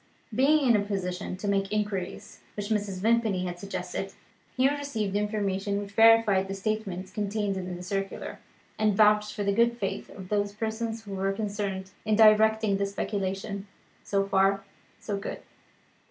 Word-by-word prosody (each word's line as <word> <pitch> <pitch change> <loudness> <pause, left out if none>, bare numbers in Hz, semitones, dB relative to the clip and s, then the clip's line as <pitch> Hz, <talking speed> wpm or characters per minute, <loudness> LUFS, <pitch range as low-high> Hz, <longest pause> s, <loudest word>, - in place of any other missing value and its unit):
Being 280 +5 +4
in 235 - +6
a 205 - +2
position 190 -2 -3
to 205 - -5
make 195 -1 +2
the 210 - -2
inquiries 205 -4 -3 0.2
which 205 0 -4
Mrs. 205 -4 -1
Vimpany 220 -4 +2
had 175 -1 -5
suggested, 200 +1 -4 0.4
Hugh 260 +2 +4
received 245 -9 -2
information 205 -1 -1
which 200 -1 -6
verified 225 -3 +5
the 195 - -4
statements 195 -3 -3
contained 205 0 -1
in 180 -1 -4
the 180 - -8
circular, 195 +1 -4 0.4
and 215 -2 +2
vouched 210 0 +4
for 205 - -2
the 200 0 +1
good 235 +2 +3
faith 195 -2 -3
of 190 -2 -10
those 205 -1 0
persons 220 +1 -3
who 200 -2 -8
were 195 0 0
concerned 200 -2 -3
in 215 -1 +2
directing 220 -1 +5
the 200 0 0
speculation. 200 0 -3 0.4
So 195 -1 +1
far, 195 0 +2 0.4
so 205 -2 -3
good. 200 - -5
205 Hz, 165 wpm, -28 LUFS, 195-215 Hz, 0.4 s, in